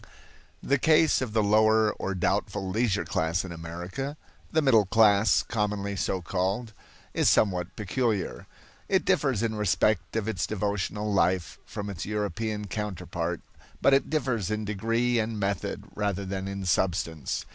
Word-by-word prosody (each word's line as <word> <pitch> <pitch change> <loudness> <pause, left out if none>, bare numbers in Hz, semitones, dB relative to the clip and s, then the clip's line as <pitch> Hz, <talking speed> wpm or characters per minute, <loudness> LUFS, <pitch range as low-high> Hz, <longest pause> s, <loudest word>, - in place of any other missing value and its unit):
The 140 0 +2
case 160 +1 +4
of 120 -5 -3
the 110 -1 +3
lower 110 +1 +4
or 95 -1 -4
doubtful 100 +2 -1
leisure 105 +1 0
class 80 +4 0
in 90 - -7
America 90 - -5 0.3
the 160 -1 +2
middle 115 -8 +5
class 105 0 +4
commonly 105 -2 -2
so 95 0 -1
called 95 +6 -2 0.4
is - - +3
somewhat 90 -3 +2
peculiar. 110 -1 -2 0.4
It - - +2
differs 125 -6 +2
in 115 -1 0
respect 105 +1 +1
of 110 -2 -1
its 100 -6 -1
devotional 105 0 -2
life 90 -3 +1
from 105 -1 -5
its 95 -5 -5
European 105 0 -2
counterpart, 105 -2 -4 0.4
but 140 - +4
it 135 - +3
differs 125 - 0
in 110 0 -2
degree 115 +4 0
and 110 -1 -2
method 100 -1 -2
rather 100 -2 -2
than 95 0 -4
in 100 -1 -4
substance. 85 -4 0
105 Hz, 145 wpm, -27 LUFS, 95-110 Hz, 0.4 s, middle